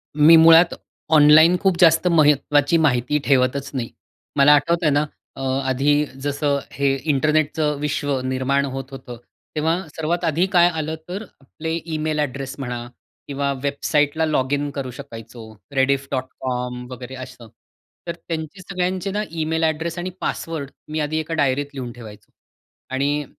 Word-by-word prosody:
मी 155 Hz, +2 st, +7 dB
मुळात 165 Hz, +1 st, +7 dB, 0.4 s
ऑनलाईन 155 Hz, +4 st, +7 dB
खूप 190 Hz, -2 st, +1 dB
जास्त 165 Hz, 0 st, +5 dB
महत्त्वाची 150 Hz, -1 st, +3 dB
माहिती 140 Hz, -3 st, +2 dB
ठेवतच 135 Hz, 0 st, +1 dB
नाही. 125 Hz, -4 st, -3 dB, 0.5 s
मला 140 Hz, +1 st, +6 dB
आठवतंय 165 Hz, +2 st, +1 dB
ना 145 Hz, +1 st, +2 dB, 0.3 s
अ, -, -, -8 dB, 0.3 s
आधी 145 Hz, +3 st, +2 dB, 0.2 s
जसं 145 Hz, 0 st, 0 dB
हे 140 Hz, -1 st, +1 dB, 0.2 s
इंटरनेटचं 150 Hz, +1 st, +1 dB
विश्व 145 Hz, -2 st, -1 dB
निर्माण 130 Hz, +2 st, 0 dB
होत 135 Hz, 0 st, -6 dB
होतं, 130 Hz, -2 st, -9 dB, 0.4 s
तेव्हा 160 Hz, +2 st, +1 dB, 0.2 s
सर्वात 170 Hz, +2 st, -2 dB
आधी 165 Hz, +3 st, +2 dB
काय 175 Hz, -1 st, +6 dB
आलं, 160 Hz, -1 st, -3 dB
तर 195 Hz, +4 st, -4 dB, 0.2 s
आपले 155 Hz, +4 st, -6 dB, 0.2 s
ईमेल 155 Hz, 0 st, -1 dB
ॲड्रेस 135 Hz, -2 st, -3 dB
म्हणा 120 Hz, -3 st, -4 dB, 0.4 s
किंवा 140 Hz, 0 st, -1 dB
वेबसाईटला 145 Hz, +2 st, +1 dB
लॉगिन 145 Hz, -1 st, 0 dB
करू 135 Hz, -3 st, -4 dB
शकायचो, 115 Hz, -3 st, -10 dB, 0.3 s
रेडिफ 135 Hz, +1 st, +1 dB
डॉट 130 Hz, -1 st, -1 dB, 0.2 s
कॉम 125 Hz, -1 st, -3 dB
वगैरे 125 Hz, +1 st, -8 dB
असं. 120 Hz, -2 st, -12 dB, 0.6 s
तर 170 Hz, -, -3 dB
त्यांचे 165 Hz, +1 st, -6 dB
सगळ्यांचे 185 Hz, +1 st, -2 dB
ना 210 Hz, +2 st, -1 dB
ईमेल 160 Hz, 0 st, -1 dB
ॲड्रेस 160 Hz, +2 st, -1 dB
आणि 180 Hz, +1 st, -3 dB
पासवर्ड 155 Hz, -4 st, -4 dB, 0.2 s
मी 155 Hz, -, -2 dB
आधी 155 Hz, +1 st, -1 dB
एका 160 Hz, +1 st, -4 dB
डायरीत 140 Hz, +1 st, +1 dB
लिहून 130 Hz, -3 st, -6 dB
ठेवायचो. 110 Hz, -3 st, -13 dB, 0.6 s
आणि 145 Hz, +2 st, 0 dB
145 Hz, 145 wpm, -21 LUFS, 135-160 Hz, 0.6 s, मी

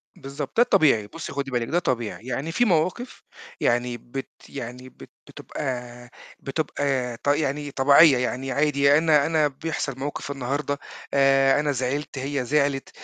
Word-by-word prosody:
بالضبط 140 Hz, +4 st, -7 dB
ده 240 Hz, -, +7 dB
الطبيعي، 145 Hz, -, +3 dB
بُصّي 165 Hz, +8 st, -8 dB
خدي 140 Hz, -1 st, -3 dB
بالِك 120 Hz, -2 st, -1 dB
ده 175 Hz, -, +1 dB
طبيعي، 120 Hz, -7 st, -3 dB
يعني 140 Hz, +5 st, -3 dB
في 215 Hz, +8 st, +2 dB
مواقِف 185 Hz, +6 st, -1 dB, 0.4 s
يعني 120 Hz, 0 st, 0 dB
بت 125 Hz, +3 st, -7 dB, 0.2 s
يعني 125 Hz, -1 st, -8 dB
بت -, -, -15 dB, 0.2 s
بتبقى 125 Hz, -3 st, -6 dB, 0.3 s
بتبقى 135 Hz, -4 st, -2 dB
ط -, -, -10 dB
يعني 145 Hz, 0 st, 0 dB
طبيعية، 140 Hz, +2 st, +6 dB
يعني 130 Hz, +1 st, -2 dB
عادي 140 Hz, 0 st, +3 dB
أنا 155 Hz, -3 st, +4 dB
أنا 160 Hz, -2 st, +2 dB
بيحصل 140 Hz, -2 st, -4 dB
موقِف 145 Hz, +1 st, -4 dB
النهارده 140 Hz, +2 st, -2 dB, 0.4 s
آآ، 135 Hz, 0 st, +4 dB
أنا 150 Hz, 0 st, 0 dB
زعلت، 140 Hz, +2 st, -3 dB
هي 135 Hz, 0 st, -2 dB
زعلت 140 Hz, 0 st, 0 dB
140 Hz, 145 wpm, -24 LUFS, 130-150 Hz, 0.4 s, ده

